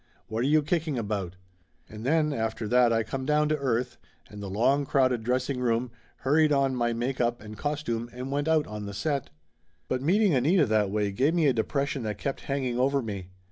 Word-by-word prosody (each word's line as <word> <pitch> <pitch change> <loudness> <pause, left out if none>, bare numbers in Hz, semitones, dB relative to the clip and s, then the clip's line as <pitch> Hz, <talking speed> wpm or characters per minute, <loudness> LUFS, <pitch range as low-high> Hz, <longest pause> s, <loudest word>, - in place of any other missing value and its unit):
What 110 +1 -4
are 125 - +1
you 155 +1 +4
kicking 155 -3 -1
about?" 100 -5 -3 0.5
And 105 +1 -9
then 150 +2 +2
after 110 -2 -2
that 125 +1 +4
I 115 0 +2
come 130 +3 -4
down 150 +2 +2
to 155 - +1
earth 125 -3 -1 0.3
and 105 0 -9
the 100 - -5
long 130 +8 +2
crowded 130 -4 +2
dressing 125 +2 -1
room, 120 0 0 0.3
hurried 150 +3 +4
on 135 -2 +2
my 120 -1 +1
make 120 +3 -2
up 120 0 0
and 105 0 -10
costume 120 -5 -3
and 125 +2 -6
went 145 +2 -1
out 160 -2 +3
on 105 -1 -6
the 100 - -7
set. 140 - -2 0.6
But 130 0 -1
meeting 190 +5 +3
Anita 150 +6 +3
that 110 -3 +2
way 105 0 0
give 135 - +1
me 165 -3 +3
a 135 - +4
depression 140 +4 -1
that 105 -3 -3
kept 135 +5 -3
hanging 130 -3 -1
over 135 +1 +2
me. 100 -5 -6
125 Hz, 210 wpm, -27 LUFS, 115-145 Hz, 0.6 s, you